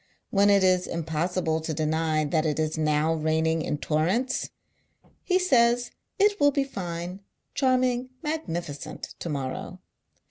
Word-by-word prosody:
When 200 Hz, 0 st, +4 dB
it 200 Hz, -1 st, +5 dB
is 185 Hz, -1 st, +3 dB
impossible 165 Hz, 0 st, -1 dB
to 160 Hz, -1 st, -3 dB
deny 155 Hz, 0 st, 0 dB
that 155 Hz, +2 st, +1 dB
it 155 Hz, -2 st, 0 dB
is 155 Hz, 0 st, 0 dB
now 155 Hz, 0 st, +1 dB
raining 160 Hz, +1 st, +1 dB
in 150 Hz, -, -2 dB
torrents, 180 Hz, -, 0 dB, 0.7 s
he 370 Hz, -, +2 dB
says 240 Hz, -9 st, +3 dB, 0.3 s
it 410 Hz, +1 st, +3 dB
will 285 Hz, -, +6 dB
be 280 Hz, -1 st, 0 dB
tine 180 Hz, -5 st, -5 dB, 0.2 s
— -, -, -51 dB
charming 255 Hz, -2 st, +1 dB
— 260 Hz, -, -39 dB
magnificent 175 Hz, -, -4 dB
— -, -, -41 dB
to 170 Hz, -, -5 dB
morrow. 135 Hz, -3 st, -4 dB
170 Hz, 150 wpm, -26 LUFS, 155-245 Hz, 0.7 s, will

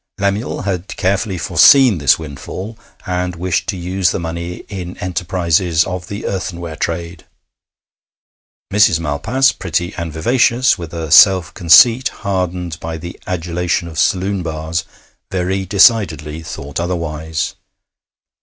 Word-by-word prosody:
Lemuel 100 Hz, +3 st, -2 dB
had 95 Hz, -1 st, -3 dB
carefully 100 Hz, 0 st, 0 dB
foreseen 95 Hz, -, +5 dB
this 70 Hz, -2 st, +4 dB
windfall, 80 Hz, -, -8 dB, 0.3 s
and 90 Hz, 0 st, -2 dB
wished 90 Hz, 0 st, -2 dB
to 100 Hz, -, -2 dB
use 90 Hz, +1 st, 0 dB
the -, -, -2 dB
money 85 Hz, +1 st, -5 dB
in 90 Hz, -3 st, -7 dB
enterprises 85 Hz, -2 st, 0 dB
of 90 Hz, -1 st, -5 dB
the 100 Hz, +1 st, -6 dB
earthenware 85 Hz, -4 st, -4 dB
trade. 85 Hz, +1 st, -4 dB, 1.5 s
Mrs. 100 Hz, -5 st, +4 dB
Malpas, 110 Hz, -, +1 dB
pretty 85 Hz, +1 st, -3 dB
and 85 Hz, -2 st, -5 dB
vivacious, 120 Hz, +9 st, +2 dB
with 85 Hz, -2 st, -8 dB
a 80 Hz, -3 st, -5 dB
self 95 Hz, -2 st, +6 dB
conceit 115 Hz, +9 st, +6 dB, 0.2 s
hardened 90 Hz, -3 st, -2 dB
by 80 Hz, 0 st, -5 dB
the 85 Hz, +2 st, -9 dB
adulation 85 Hz, 0 st, -2 dB
of 80 Hz, -1 st, -6 dB
saloon 95 Hz, +1 st, +1 dB
bars, 80 Hz, 0 st, -3 dB, 0.4 s
very 95 Hz, +1 st, -2 dB
decidedly 90 Hz, -8 st, +3 dB
thought 70 Hz, -2 st, -6 dB
otherwise. 80 Hz, -3 st, -3 dB
90 Hz, 125 wpm, -17 LUFS, 80-95 Hz, 1.5 s, self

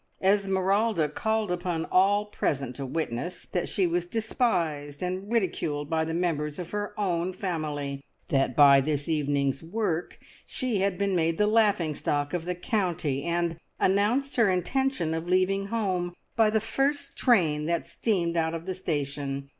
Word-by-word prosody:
Esmeralda 195 Hz, -1 st, +2 dB
called 220 Hz, +5 st, -1 dB
upon 175 Hz, -2 st, -2 dB
all 200 Hz, +3 st, +4 dB
present 140 Hz, -10 st, -2 dB
to 135 Hz, 0 st, -5 dB
witness 160 Hz, +4 st, -3 dB
that 180 Hz, -, -1 dB
she 190 Hz, -, +1 dB
was 175 Hz, 0 st, 0 dB
despised 170 Hz, -, -1 dB
and 185 Hz, +3 st, -3 dB
ridiculed 160 Hz, -9 st, -1 dB
by 160 Hz, 0 st, +2 dB
the 160 Hz, -, -3 dB
members 150 Hz, -4 st, -1 dB
of 175 Hz, -2 st, -6 dB
her 205 Hz, 0 st, -4 dB
own 180 Hz, -3 st, 0 dB
family; 150 Hz, -7 st, -3 dB, 0.3 s
that 135 Hz, -3 st, +1 dB
by 140 Hz, -2 st, +7 dB
this 145 Hz, 0 st, -2 dB
evening's 140 Hz, -3 st, 0 dB
work 175 Hz, -1 st, -2 dB, 0.3 s
she 250 Hz, -6 st, -1 dB
had 195 Hz, -1 st, 0 dB
been 200 Hz, -1 st, 0 dB
made 165 Hz, -1 st, +1 dB
the 210 Hz, -, +3 dB
laughing 210 Hz, -7 st, +3 dB
stock 145 Hz, 0 st, -1 dB
of 175 Hz, -2 st, -2 dB
the 180 Hz, 0 st, -2 dB
county; 175 Hz, -, -1 dB
and 170 Hz, -1 st, 0 dB, 0.2 s
announced 225 Hz, +9 st, +2 dB
her 230 Hz, -4 st, +5 dB
intention 185 Hz, -, 0 dB
of 165 Hz, +1 st, -3 dB
leaving 190 Hz, +2 st, +2 dB
home 185 Hz, -5 st, -1 dB, 0.2 s
by 225 Hz, -2 st, +4 dB
the 220 Hz, +1 st, +2 dB
first 275 Hz, +6 st, -1 dB
train 160 Hz, -, +3 dB
that 170 Hz, 0 st, 0 dB
steamed 175 Hz, -7 st, -1 dB
out 165 Hz, 0 st, +1 dB
of 165 Hz, 0 st, -6 dB
the 190 Hz, -, -2 dB
station. 140 Hz, -5 st, -3 dB
175 Hz, 160 wpm, -27 LUFS, 155-200 Hz, 0.3 s, by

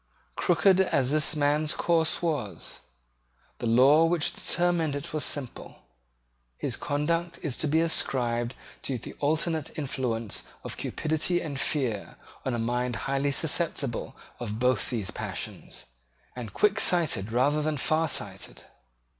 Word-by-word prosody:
Crooked 185 Hz, +2 st, +4 dB
as 140 Hz, -8 st, +1 dB
this 155 Hz, +2 st, +3 dB
man's 150 Hz, +2 st, +2 dB
course 165 Hz, -1 st, +1 dB
was, 130 Hz, -, -3 dB, 0.8 s
the 120 Hz, -, -2 dB
law 135 Hz, +7 st, +6 dB
which 165 Hz, -2 st, +2 dB
determined 175 Hz, -4 st, +1 dB
it 145 Hz, +3 st, -5 dB
was 155 Hz, -, 0 dB
simple. 135 Hz, -4 st, -3 dB, 0.7 s
His -, -, -2 dB
conduct 165 Hz, +4 st, -1 dB
is 145 Hz, -7 st, -1 dB
to 155 Hz, -, 0 dB
be 160 Hz, +3 st, +3 dB
ascribed 120 Hz, -7 st, +1 dB, 0.3 s
to 130 Hz, -, -2 dB
the -, -, -9 dB
alternate 155 Hz, +1 st, 0 dB
influence 125 Hz, -7 st, -2 dB, 0.2 s
of -, -, -4 dB
cupidity 160 Hz, +3 st, 0 dB
and 145 Hz, -5 st, -4 dB
fear 125 Hz, -11 st, -1 dB, 0.3 s
on 130 Hz, -, -1 dB
a -, -, -1 dB
mind 120 Hz, +1 st, -1 dB
highly 140 Hz, +1 st, +1 dB
susceptible 145 Hz, -5 st, -1 dB, 0.2 s
of 110 Hz, -3 st, -4 dB
both 125 Hz, -2 st, +1 dB
those 110 Hz, -6 st, -2 dB
passions, -, -, -6 dB, 0.5 s
and 120 Hz, -4 st, -6 dB
quicksighted 175 Hz, -, +3 dB
rather 140 Hz, +6 st, +2 dB
than 155 Hz, 0 st, -1 dB
farsighted. 160 Hz, +4 st, -1 dB
145 Hz, 130 wpm, -28 LUFS, 125-160 Hz, 0.8 s, law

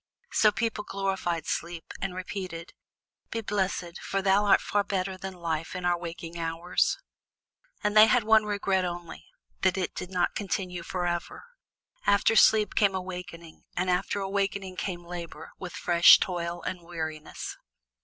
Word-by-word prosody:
So 215 Hz, -, +5 dB
people 210 Hz, 0 st, -2 dB
glorified 190 Hz, -5 st, -2 dB
sleep, 170 Hz, 0 st, -4 dB
and 195 Hz, -2 st, -3 dB
repeated: 185 Hz, -2 st, -6 dB, 0.6 s
"Be 230 Hz, -, -3 dB
blessed, 190 Hz, -4 st, -2 dB
for 195 Hz, -1 st, -2 dB
thou 195 Hz, +2 st, +4 dB
art 200 Hz, -, +6 dB
far 205 Hz, 0 st, 0 dB
better 190 Hz, -1 st, -2 dB
than 190 Hz, 0 st, -7 dB
life 165 Hz, -2 st, -3 dB
in 180 Hz, -1 st, -4 dB
our 175 Hz, 0 st, +3 dB
waking 170 Hz, 0 st, -7 dB
hours." 165 Hz, +2 st, 0 dB, 0.9 s
And 210 Hz, 0 st, +1 dB
they 215 Hz, +1 st, +9 dB
had 245 Hz, +1 st, +3 dB
one 220 Hz, 0 st, +5 dB
regret 200 Hz, -2 st, 0 dB
only, 175 Hz, -1 st, -6 dB, 0.3 s
that 190 Hz, 0 st, +2 dB
it 185 Hz, -, -2 dB
did 180 Hz, -, -6 dB
not 180 Hz, -2 st, 0 dB
continue 185 Hz, -3 st, -3 dB
forever. 175 Hz, 0 st, -3 dB, 0.6 s
After 200 Hz, +2 st, +4 dB
sleep 215 Hz, -1 st, +5 dB
came 200 Hz, -3 st, +3 dB
awakening, 180 Hz, -3 st, -7 dB
and 180 Hz, +1 st, +1 dB
after 190 Hz, +3 st, 0 dB
awakening 195 Hz, -1 st, -2 dB
came 175 Hz, -3 st, -4 dB
labor 170 Hz, -1 st, -7 dB
with 180 Hz, -2 st, -7 dB
fresh 175 Hz, -3 st, +7 dB
toil 175 Hz, -1 st, -3 dB
and 180 Hz, -1 st, -4 dB
weariness. 160 Hz, -3 st, -6 dB
185 Hz, 150 wpm, -28 LUFS, 175-200 Hz, 0.9 s, they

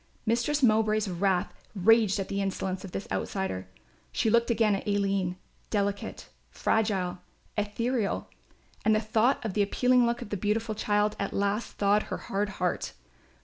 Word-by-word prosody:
Mistress 240 Hz, +6 st, +1 dB
Mowbray's 215 Hz, -2 st, +3 dB
wrath 185 Hz, 0 st, 0 dB, 0.2 s
raged 210 Hz, +1 st, +4 dB
at 195 Hz, -, -2 dB
the 200 Hz, 0 st, -2 dB
insolence 190 Hz, -1 st, -2 dB
of 190 Hz, -, -8 dB
this 195 Hz, -, -5 dB
outsider. 95 Hz, -, -2 dB, 0.4 s
She 220 Hz, -, +1 dB
looked 235 Hz, +1 st, +3 dB
again 225 Hz, -3 st, +3 dB
at 195 Hz, -, -3 dB
Aline, 195 Hz, -3 st, +1 dB, 0.3 s
delicate, 200 Hz, -1 st, -2 dB, 0.2 s
fragile, 190 Hz, -5 st, 0 dB, 0.4 s
ethereal, 220 Hz, +2 st, -1 dB, 0.6 s
and 220 Hz, -, +4 dB
the -, -, +3 dB
thought 220 Hz, +4 st, +1 dB
of 215 Hz, -, -2 dB
the 210 Hz, -, +2 dB
appealing 250 Hz, +4 st, +3 dB
look 235 Hz, 0 st, -1 dB
of -, -, -11 dB
the 205 Hz, -, -2 dB
beautiful 215 Hz, +3 st, 0 dB
child 210 Hz, 0 st, +1 dB
at 200 Hz, -, -2 dB
last 200 Hz, +3 st, -1 dB
thawed 205 Hz, +1 st, +3 dB
her -, -, -2 dB
hard 200 Hz, +1 st, -2 dB
heart. 180 Hz, -1 st, -1 dB
210 Hz, 155 wpm, -28 LUFS, 195-225 Hz, 0.6 s, raged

